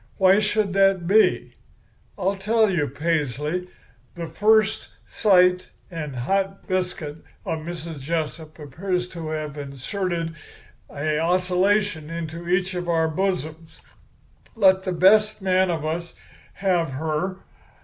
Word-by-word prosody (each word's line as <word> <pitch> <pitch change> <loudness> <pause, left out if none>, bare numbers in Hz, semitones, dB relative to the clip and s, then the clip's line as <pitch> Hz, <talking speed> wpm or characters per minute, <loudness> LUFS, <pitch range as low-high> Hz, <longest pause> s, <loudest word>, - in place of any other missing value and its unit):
Why 190 +1 +5
should 210 -2 0
that 195 -2 +3
be? 210 +5 +3 0.6
I'll 195 0 0
tell 215 +2 +2
you, 155 -6 0
Paisley, 150 +3 -2 0.5
the 170 -1 -5
first 215 +6 +2 0.2
sight 180 -3 +3 0.2
and 155 -5 -5
hot 195 +10 -1
biscuit 180 -5 -2 0.3
of 165 -4 -2
Mrs. 165 -1 -7
Jessup 155 +1 -4
appears 180 +5 -3
to 165 -3 -7
have 155 -2 -4
inserted 165 +5 -3 0.6
a 150 +1 -1
oscillation 180 0 +1
into 165 +1 -6
each 180 +1 +1
of 175 -1 -4
our 165 -1 +2
bosoms. 165 -3 -3 0.8
Let 190 -3 +4
the 185 - -1
best 210 +5 +4
man 185 -1 +2
of 160 -3 -2
us 170 +2 -4 0.4
have 175 -7 0
her. 160 +6 -2
175 Hz, 120 wpm, -23 LUFS, 160-190 Hz, 0.8 s, Why